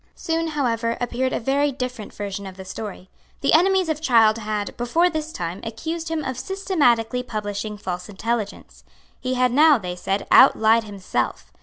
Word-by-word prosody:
Soon, 330 0 -1
however, 235 -6 -1
appeared 250 +1 -1
a - - -1
very 280 +4 +1
different 250 -4 -5
version 200 -1 -5
of 185 -1 -10
the 190 - -9
story. 190 -1 -7 0.3
The 275 - +2
enemies 375 +2 +4
of 310 -1 -2
Child 230 -6 +4
had, 210 -1 -3
before 325 +10 +2
this 315 0 -3
time, 175 - -4
accused 320 +9 -4
him 320 -2 -2
of 260 -1 -3
systematically 255 - +1
publishing 210 -2 -4
false 180 -2 -5
intelligence. 210 +1 -4 0.4
He 255 0 -2
had 250 -1 +2
now, 300 +3 +6
they 180 -5 -5
said, 195 +3 -2
outlied 220 +1 +6
himself. 200 -3 -3
235 Hz, 165 wpm, -23 LUFS, 210-295 Hz, 0.4 s, now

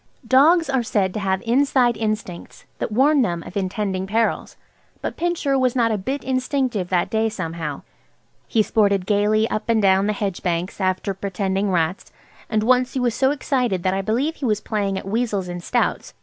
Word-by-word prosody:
Dogs 315 +7 +5
are 265 -2 +1
said 200 -5 0
to - - -3
have 190 -1 -1
inside 250 -1 +3
instincts 215 -5 -4
that - - -3
warn 275 +6 +4
them 170 -7 -1
of - - -11
intending 190 -1 -2
perils, 225 +3 -1 0.4
but - - -4
Pincher 325 -6 0
was 255 -1 +1
not 230 -3 +2
a 215 - 0
bit 270 +9 -3
instinctive 255 -7 -1
that 180 -2 0
day 220 0 +1
somehow. 165 -7 -5 0.6
He 220 - +2
sported 200 -3 +2
gaily 210 +2 +2
up 215 - -3
and 230 -1 +3
down 195 -1 +3
the 210 - +1
hedge 200 -3 -3
banks 180 +2 -2
after 185 +1 0
pretending 195 +1 -2
rats, 170 0 -1 0.4
and 215 -1 +1
once 255 +2 +2
he - - +1
was 245 -2 +1
so 265 +2 +2
excited 250 -9 -1
that 185 - +1
I 195 - 0
believe 250 +10 -1
he 280 - -4
was 215 -3 +1
playing 200 -3 -2
at 190 - -6
weasels 210 -3 -1
and 175 0 -5
stoats. - - -1
215 Hz, 190 wpm, -22 LUFS, 190-250 Hz, 0.6 s, Dogs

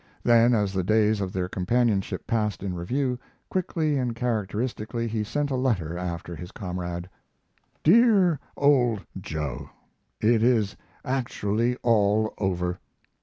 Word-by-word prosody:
Then, 120 0 +5
as 100 -3 0
the 95 -1 0
days 110 +1 +2
of 95 -2 -2
their 90 -1 -2
companionship 100 +2 0
passed 105 -6 -1
in 95 -2 -2
review, 125 +9 -1 0.3
quickly 160 -5 0
and 125 -2 -1
characteristically 115 0 -2
he 110 -1 -1
sent 145 +6 -2
a - - 0
letter 110 -11 0
after 85 -1 -4
his 90 +2 -9
comrade: 90 -2 -5 0.8
DEAR 195 - +5 0.2
OLD 125 -7 +3
JOE, 75 -8 -5 0.5
It 110 0 +3
is 115 -4 +2 0.3
actually 120 -3 0
all 110 -2 +3
over! 90 -2 -1
110 Hz, 125 wpm, -26 LUFS, 95-125 Hz, 0.8 s, Then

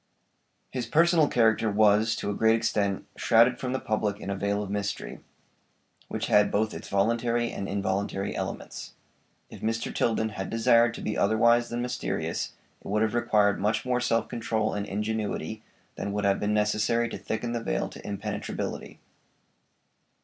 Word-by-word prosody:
His 125 -3 -3
personal 165 +2 +4
character 115 -3 +3
was, 105 +2 +4
to 105 - -3
a - - -2
great 110 +2 +4
extent, 100 -4 0
shrouded 120 +2 +4
from 125 - -3
the 130 - -1
public 105 -1 -1
in 100 - -5
a - - -1
veil 100 +1 -1
of 100 - -6
mystery, 100 0 -3 0.9
which - - -3
had 105 0 +4
both 110 +2 0
its - - -8
voluntary 115 +4 +1
and 100 - -5
involuntary 100 0 -2
elements. - - -5 0.6
If - - -11
Mr. 115 +1 -2
Tilden 110 -1 +1
had 95 -3 -5
desired 115 0 +4
to - - -7
be 105 - -2
otherwise 115 +3 +3
than 120 +1 -2
mysterious 95 -9 -3 0.3
it - - -10
would 105 +2 +1
have 110 - 0
required 105 -4 +2
much 105 +3 0
more 125 -1 +1
self 115 -1 +1
control 110 -2 -1
and 105 0 -3
ingenuity 110 +1 -3 0.4
than 100 - -3
would 105 0 -1
have 100 -1 +2
been 105 +1 0
necessary 105 +3 +1
to - - -5
thicken 115 +2 -3
the 120 -1 -2
veil - - -1
to - - -12
impenetrability. 105 +1 -5
110 Hz, 165 wpm, -27 LUFS, 100-115 Hz, 0.9 s, personal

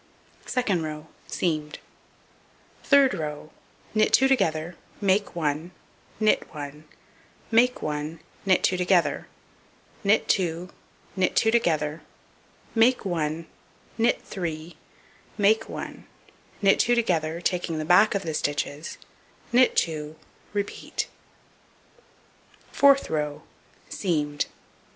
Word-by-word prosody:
Second 215 -9 0
row: 155 0 -6 0.2
Seamed. 155 -3 -2 1.1
Third 280 -2 +5
row: 155 -3 -5 0.4
Knit 215 0 +3
2 265 - +5
together, 175 -9 +1 0.2
make 200 -1 +1
1, 155 0 -1 0.5
knit 215 -1 +2
1, 145 +1 -7 0.7
make 245 +2 +3
1, 150 +2 -3 0.2
knit 190 -2 +3
2 185 - +2
together, 180 -1 +2 0.8
knit 205 +2 +3
2, 175 -1 0 0.5
knit 185 -1 +1
2 220 - +4
together, 160 -8 +1 0.7
make 240 +1 +3
1, 165 -2 -2 0.5
knit 235 +2 +3
3, 165 -3 -5 0.6
make 210 +1 +3
1, - - -7 0.6
knit 195 - +5
2 240 - +4
together, 170 -8 0
taking 175 -2 -1
the 155 - -3
back 200 +6 +5
of 200 - -1
the 160 - -3
stitches, 145 +1 -2 0.5
knit 250 +1 +5
2; 155 -2 -1 0.4
repeat. 205 -1 -3 1.6
Fourth 275 -1 +5
row: 150 -2 -2 0.4
Seamed. 150 -6 -1
175 Hz, 105 wpm, -26 LUFS, 155-210 Hz, 1.6 s, Third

